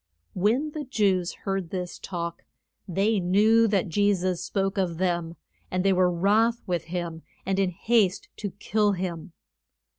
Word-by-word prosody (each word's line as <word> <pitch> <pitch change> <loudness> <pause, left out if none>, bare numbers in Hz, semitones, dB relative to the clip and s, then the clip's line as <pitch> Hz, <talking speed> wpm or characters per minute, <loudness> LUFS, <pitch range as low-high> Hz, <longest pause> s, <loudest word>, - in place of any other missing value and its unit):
When 240 +11 +1
the 300 0 -5
Jews 200 -9 +1
heard 195 -3 -2
this 180 -1 -5
talk 170 -2 -5 0.4
they 200 +4 +1
knew 215 +5 +4
that 200 -3 +1
Je 205 +4 +2
sus 180 -1 -1
spoke 195 +2 -1
of 175 -4 -1
them, 170 -2 -1 0.3
and 185 +1 -1
they 195 - +5
were 180 -1 +3
wroth 215 +7 +2
with 175 -3 -2
him, 170 -1 -4 0.2
and 190 +1 0
in 195 -2 +2
haste 200 +1 +1
to 205 - -3
kill 205 +2 0
him. 175 -3 -5
190 Hz, 155 wpm, -26 LUFS, 175-205 Hz, 0.4 s, they